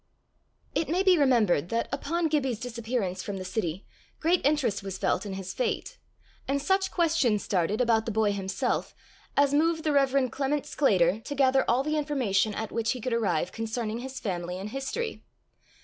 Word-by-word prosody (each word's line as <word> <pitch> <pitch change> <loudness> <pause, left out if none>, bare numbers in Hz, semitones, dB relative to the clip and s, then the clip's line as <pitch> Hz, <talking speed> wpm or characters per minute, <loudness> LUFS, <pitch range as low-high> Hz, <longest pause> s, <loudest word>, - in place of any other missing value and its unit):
It 325 - -1
may 360 +4 +2
be 375 -2 +6
remembered 230 - +3
that, 230 0 0
upon 325 +4 -1
Gibbie's 270 -7 0
disappearance 230 -6 -3
from 200 0 -5
the 185 - -6
city, 185 -2 -3 0.3
great 340 +2 +2
interest 275 -8 +1
was 195 -1 -5
felt 205 - 0
in 195 - -4
his 190 -1 -5
fate, - - -2 0.5
and 280 +1 +1
such 380 +5 +1
questions 315 - +2
started 195 +2 0
about 230 -2 +2
the - - 0
boy 215 -1 +2
himself 195 -1 -2 0.4
as 285 0 +4
moved 320 +2 +2
the 310 - +1
Rev. 275 -3 +2
Clement 280 +2 -1
Sclater 195 - +2
to 275 +5 -6
gather 265 -1 +4
all 250 +3 +3
the 305 +1 0
information 230 -9 +1
at 220 -1 -4
which 230 +1 0
he 255 - -6
could 245 +1 -2
arrive 200 -7 0
concerning 225 0 -3
his 260 +1 -6
family 180 -3 -3
and 195 +3 -5
history. 270 - -4
240 Hz, 180 wpm, -28 LUFS, 205-285 Hz, 0.5 s, be